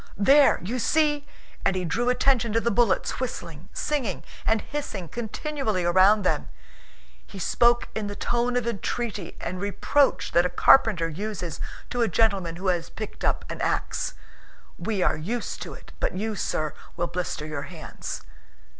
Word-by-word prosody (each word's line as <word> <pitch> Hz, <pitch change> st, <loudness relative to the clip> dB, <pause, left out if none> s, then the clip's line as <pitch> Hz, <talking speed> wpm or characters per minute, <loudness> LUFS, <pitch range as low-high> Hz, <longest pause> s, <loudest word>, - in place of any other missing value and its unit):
"There, 275 Hz, +8 st, +6 dB
you 235 Hz, +7 st, -2 dB
see!" 295 Hz, +3 st, +2 dB, 0.4 s
and 195 Hz, -, +2 dB
he 185 Hz, -1 st, -1 dB
drew 240 Hz, +8 st, 0 dB
attention 250 Hz, -3 st, +2 dB
to 230 Hz, -, +4 dB
the 235 Hz, +1 st, +1 dB
bullets 225 Hz, -2 st, +2 dB
whistling, 170 Hz, -, -5 dB
singing, 260 Hz, -11 st, -2 dB, 0.2 s
and 220 Hz, -1 st, +3 dB
hissing 250 Hz, -, -5 dB
continually 230 Hz, -, -2 dB
around 190 Hz, +4 st, +5 dB
them. 75 Hz, -, 0 dB, 0.8 s
He -, -, -10 dB
spoke 240 Hz, +5 st, +3 dB
in 215 Hz, -2 st, -2 dB
the 205 Hz, -, -5 dB
tone 240 Hz, +2 st, 0 dB
of 245 Hz, -, 0 dB
entreaty 225 Hz, -3 st, -3 dB
and 180 Hz, +1 st, -4 dB
reproach 265 Hz, +7 st, +2 dB
that 175 Hz, -, +5 dB
a 180 Hz, -, +1 dB
carpenter 195 Hz, -10 st, +5 dB
uses 180 Hz, 0 st, -4 dB, 0.3 s
to 245 Hz, -, 0 dB
a 230 Hz, -, +4 dB
gentleman 195 Hz, -4 st, +1 dB
who 185 Hz, +3 st, -7 dB
has 175 Hz, -2 st, 0 dB
picked 215 Hz, -, -7 dB
up -, -, +1 dB
an -, -, -6 dB
ax: -, -, -1 dB, 0.6 s
"We 205 Hz, -5 st, 0 dB
are -, -, +3 dB
used 220 Hz, +10 st, -3 dB
to -, -, -6 dB
it, -, -, -14 dB
but -, -, -1 dB
you, 215 Hz, +2 st, -2 dB
sir, 155 Hz, -5 st, -1 dB, 0.2 s
will 175 Hz, -, +1 dB
blister 175 Hz, -3 st, -3 dB
your 150 Hz, -2 st, -4 dB
hands." 165 Hz, -4 st, -7 dB
210 Hz, 165 wpm, -26 LUFS, 180-240 Hz, 0.8 s, There